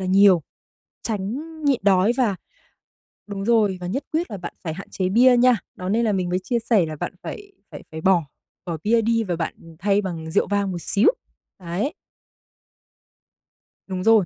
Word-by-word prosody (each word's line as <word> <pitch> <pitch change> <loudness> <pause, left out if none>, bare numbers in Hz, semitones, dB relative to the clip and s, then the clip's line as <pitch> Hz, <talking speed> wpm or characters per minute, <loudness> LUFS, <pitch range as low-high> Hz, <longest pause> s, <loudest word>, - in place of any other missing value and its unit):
là 185 - -3
nhiều, 190 -3 +6 0.6
tránh 205 -2 -2 0.3
nhịn 275 -4 +3
đói 195 +3 +4
và 220 -7 +2 0.9
đúng 200 -1 -5
rồi, 215 -5 +3
và 175 - -4
nhất 265 +9 -2
quyết 325 -6 -1
là 205 - -4
bạn 175 - -7
phải 160 - -3
hạn 195 +5 -9
chế 185 -1 -1
bia 245 +5 +6
nha. 250 0 +5 0.2
Đó 185 +1 -5
nên 230 +3 +2
là 215 - +2
mình 185 -2 -1
mới 180 +1 0
chia 240 +4 0
sẻ 220 -6 +2
là 155 -1 -5
bạn - - -4
phải 405 -1 -8 0.2
phải - - -8
phải 160 - -6
bỏ 175 -3 +3 0.4
bỏ 170 -3 -3
bia 230 +2 +3
đi, 230 +1 +1
và 180 -5 -2
bạn, 165 -1 -3
ừm, 165 -1 -14
thay 200 +1 +2
bằng 165 -4 -5
rượu - - +2
vang 200 -1 0
một 175 -2 -5
xíu. 205 +2 +2 0.5
Đấy. 185 - -2 1.9
Đúng 185 -1 -3
rồi. 225 -4 +5
195 Hz, 195 wpm, -23 LUFS, 180-230 Hz, 1.9 s, nhiều